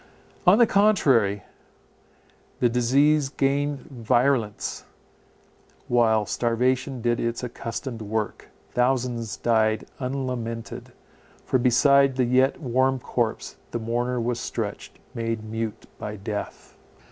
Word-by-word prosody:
On 185 +4 +8
the 240 - +7
contrary, 135 - +3 1.2
the 120 - +3
disease 135 +5 +3
gained 140 0 0
virulence, 120 -2 0 1.0
while 110 -3 +3
starvation 125 +3 0
did 120 0 +1
its 115 +1 -2
accustomed 115 0 -5
work. 110 0 -3 0.2
Thousands 125 -4 0
died 110 -2 +1
unlamented; 125 -4 -4 0.5
for 130 - +1
beside 135 +2 +4
the 130 -1 +2
yet 130 +2 +2
warm 130 -1 +1
corpse 120 -2 -3
the - - -3
mourner 120 +2 -1
was 120 +1 -1
stretched, - - -5 0.2
made 115 -1 -3
mute 110 0 -5
by 105 0 -5
death. 105 0 -6
120 Hz, 105 wpm, -25 LUFS, 115-130 Hz, 1.2 s, On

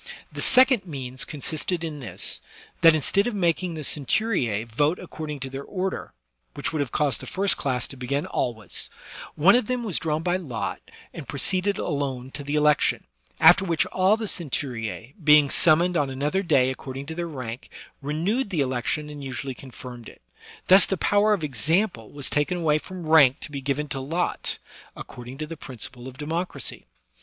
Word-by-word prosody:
The - - -5
second 255 -6 +5
means 130 -4 -4
consisted 160 +4 -2
in 155 -3 -4
this, 125 - -2 0.4
that 165 -1 +8
instead 195 - +1
of 240 - -2
making 175 -2 0
the 155 - -5
centuricB 135 - +1
vote 145 +9 +1
according 155 -4 -6
to 135 - -4
their 135 +1 -5
order, 190 +2 -3 0.4
which - - -3
would 155 - -1
have 140 -4 -1
caused 145 -3 0
the - - -9
first 195 +1 +2
class 125 -3 -2
to - - -8
begin 140 +4 -2
always, 115 - -3 0.5
one 180 +7 +6
of 245 -3 +3
them* 250 -1 -1
was 205 -7 -1
drawn 155 0 -1
by 180 +1 +1
lot 130 -12 -4 0.3
and 160 -5 -8
proceeded 185 +7 +1
alone 135 -4 -3
to 145 +1 -7
the 145 +1 -2
election; 150 0 +3 0.4
after - - +7
which 170 -3 +1
all 190 +3 +2
the 225 - -3
centurice^ 130 - -3
being 150 -2 +6
summoned 175 +3 +4
on 145 -4 +1
another 145 +8 -1
day 135 -8 +3
according 130 +1 -7
to 160 - -6
their 170 +1 -3
rank, 125 -5 -7 0.3
renewed 175 - -1
the 170 -7 0
election 130 +3 -1
and 145 -1 -8
usually 135 0 -4
confirmed 125 -2 -10
it. - - -18 0.4
Thus 190 +1 +7
the 195 - -1
power 205 +4 +3
of 200 -6 +1
example 150 - 0
was 145 -2 -7
taken 150 +5 0
away 155 -3 +2
from 180 +1 -8
rank 155 -3 +6
to 150 - -7
be 140 -1 -5
given 140 +2 -1
to 135 - -3
lot, 165 +7 -2 0.4
according 125 +2 -9
to 155 - -4
the 165 +1 -8
principle 125 -2 -7
of 130 0 -10
democracy. 150 -3 -3
150 Hz, 180 wpm, -25 LUFS, 135-175 Hz, 0.5 s, that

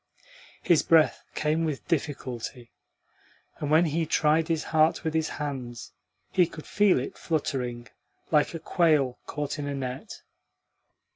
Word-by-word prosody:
His 170 -3 +4
breath 160 -2 +3
came 155 +2 +1
with 155 -4 -3
difficulty, 130 -6 -3 0.9
and 145 - -3
when 160 +3 +5
he 160 +1 -1
tried 155 +1 +2
his 165 -2 0
heart 160 0 +2
with 160 -1 -1
his 160 0 0
hands 130 -6 -5 0.4
he 180 -2 +4
could 155 -2 -10
feel 205 -7 +3
it 130 - -6
fluttering 125 -6 -2 0.4
like 150 +1 +3
a - - -4
quail 155 -7 +2
caught 150 0 -4
in 145 - -3
a 140 - -3
net. 130 -1 -6
150 Hz, 140 wpm, -27 LUFS, 135-160 Hz, 0.9 s, when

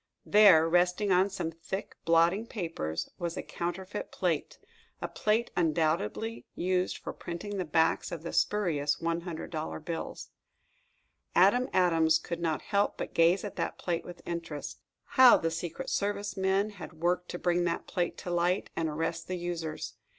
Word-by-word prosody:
There, 195 -6 +7
resting 180 +4 +2
on 185 +2 +4
some 165 -4 -3
thick 170 +4 -6
blotting 170 +6 +3
paper, 165 - -4 0.2
was 170 -1 -3
a - - -3
counterfeit 180 +3 -5
plate 170 -5 -1 0.4
a - - -3
plate 220 +3 0
undoubtedly 165 - 0
used 185 0 0
for - - -6
printing 185 +4 -6
the 185 - -1
backs 160 +3 +2
of 165 -2 -5
the 170 - -5
spurious 160 -9 +1
$100 165 -2 -4
bills! 165 -1 -5 1.0
Adam 205 +8 +5
Adams 165 -3 +4
could 170 +1 -5
not 165 -2 -1
help 200 -1 +1
but - - -5
gaze 170 +3 +4
at 205 - -6
that - - -2
plate 170 -2 -2
with 175 0 -11
interest. 170 -4 -5 0.2
How 255 -2 +7
the 165 - -1
Secret 165 0 -5
Service 205 0 -1
men 195 +2 +1
had 180 -7 -9
worked 175 +2 -1
to - - -4
bring 175 0 +1
that 170 -1 -1
plate 175 -1 -2
to 175 - -4
light, 175 +2 +1
and 160 -1 0
arrest 165 +2 -3
the 185 - -3
users! 170 -3 -4
175 Hz, 160 wpm, -30 LUFS, 165-190 Hz, 1.0 s, There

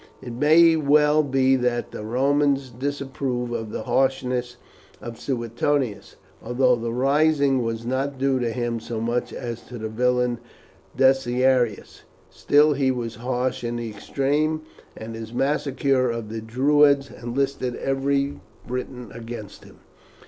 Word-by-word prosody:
It 120 -2 -8
may 160 +6 +5
well 150 0 +4
be 135 -2 +2
that 125 -1 -1
the - - -7
Romans 135 +3 +1
disapprove 130 -1 -3
of 115 -2 -4
the - - -4
harshness 125 -2 0 0.4
of 115 -1 -8
Suetonius, 120 -1 -2 0.3
although 125 +2 +2
the 115 0 -4
rising 140 +1 +2
was 115 0 -3
not 135 +3 -2
due 135 0 +1
to 120 -2 0
him 120 -1 -2
so 115 0 -5
much 120 +2 -1
as 120 -1 -6
to 125 - -8
the 110 -1 -4
villain 125 +1 +1 0.6
Decianus. 130 -3 +2 0.3
Still 150 +1 +4
he 135 -1 +1
was 120 -4 -3
harsh 125 +1 -2
in 120 0 -2
the 120 -2 -4
extreme, 145 +8 -1 0.3
and 110 +1 -7
his 115 0 -8
massacre 135 -2 +1
of 115 -2 -4
the 110 0 -5
Druids 140 +4 +3
enlisted 125 +1 -2
every 140 +1 -1 0.3
Briton 125 0 -6
against 115 -3 -9
him. - - -17
125 Hz, 135 wpm, -23 LUFS, 120-140 Hz, 0.6 s, may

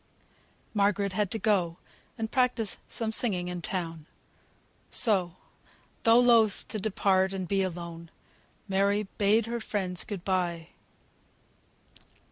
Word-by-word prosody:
Margaret 200 -1 +1
had 205 0 0
to 225 - -2
go 185 -6 +1 0.4
and 220 -1 -4
practise 250 -5 +1
some 225 -2 -2
singing 185 -6 +1
in 180 -1 -5
town; 165 -3 -4 0.8
so, 185 -6 +3 0.7
though 230 0 +5
loth 230 -4 +4
to 215 - -1
depart 190 -2 +1
and 190 -2 -4
be 195 +1 +1
alone, 170 -2 -5 0.6
Mary 200 +2 +1 0.2
bade 210 +2 +3
her 235 +1 -3
friends 190 -5 0
good 195 -4 -7
bye. 175 -3 -1
195 Hz, 115 wpm, -28 LUFS, 180-220 Hz, 0.8 s, though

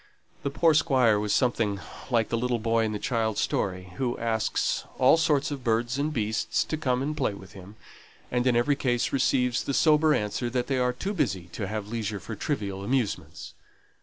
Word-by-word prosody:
The 140 - -1
poor 160 +3 +3
Squire 130 -8 +3
was 105 0 -2
something 115 -5 +1 0.3
like 115 -3 +1
the 115 - 0
little 125 0 0
boy 115 0 +1
in 110 - -2
the 105 - -2
child's 110 -1 -1
story, 95 -1 -2
who 125 -2 -1
asks 110 -1 0
all 130 - +6
sorts 150 -2 +1
of 140 -3 -5
birds 120 +3 0
and 150 +2 0
beasts 110 -5 0
to - - -3
come 130 -4 0
and 150 +2 -2
play 105 -9 -1
with 95 -1 -13
him; 100 +2 -12 0.6
and, 125 +1 +1
in 125 - +3
every 120 +5 +3
case, 120 -3 0
receives 125 -2 +2
the 140 - -2
sober 155 -1 +4
answer, 105 +3 -2
that 125 0 -1
they 135 -2 -1
are 125 0 +2
too 195 +11 -4
busy 95 - -1
to 100 +3 -5
have 105 0 -4
leisure 110 -3 -3
for 110 - -7
trivial 100 -5 -3
amusements. 120 0 -2
120 Hz, 195 wpm, -27 LUFS, 105-135 Hz, 0.6 s, all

